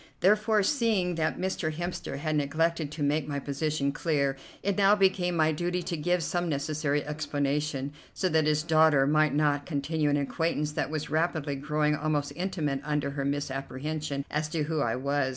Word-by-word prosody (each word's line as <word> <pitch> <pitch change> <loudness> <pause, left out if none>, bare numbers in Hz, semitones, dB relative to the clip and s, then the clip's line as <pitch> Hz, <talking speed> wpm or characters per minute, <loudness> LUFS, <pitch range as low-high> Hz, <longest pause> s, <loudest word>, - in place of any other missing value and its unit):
Therefore, 210 +2 +4
seeing 215 -7 +1
that 160 -2 -1
Mr. 185 -4 -1
Hemster 175 -2 -4
had 155 +1 -1
neglected 155 +1 0
to 155 -1 -4
make 145 0 +1
my 145 -1 -2
position 140 0 -1
clear, 140 -3 0 0.3
it 200 0 +1
now 200 0 +5
became 185 -3 +2
my 160 -1 +3
duty 175 +3 -1
to 170 - -3
give 175 +2 0
some 175 +2 -1
necessary 145 0 -1
explanation, 145 -1 -2 0.2
so 185 - -1
that 160 -2 +2
his 150 0 +2
daughter 155 -4 +4
might 155 0 +3
not 145 -1 +1
continue 150 0 0
an 145 - +2
acquaintance 150 +1 -1
that 150 - -2
was 155 -1 -4
rapidly 155 -2 0
growing 150 +2 0
almost 145 -1 -1
intimate 165 -6 -2
under 150 -1 -1
her 140 0 -3
misapprehension 140 +1 -3
as 150 +1 -1
to 155 -1 -1
who 155 +1 -1
I 115 -4 +1
was. 140 +1 0
150 Hz, 175 wpm, -28 LUFS, 145-165 Hz, 0.3 s, now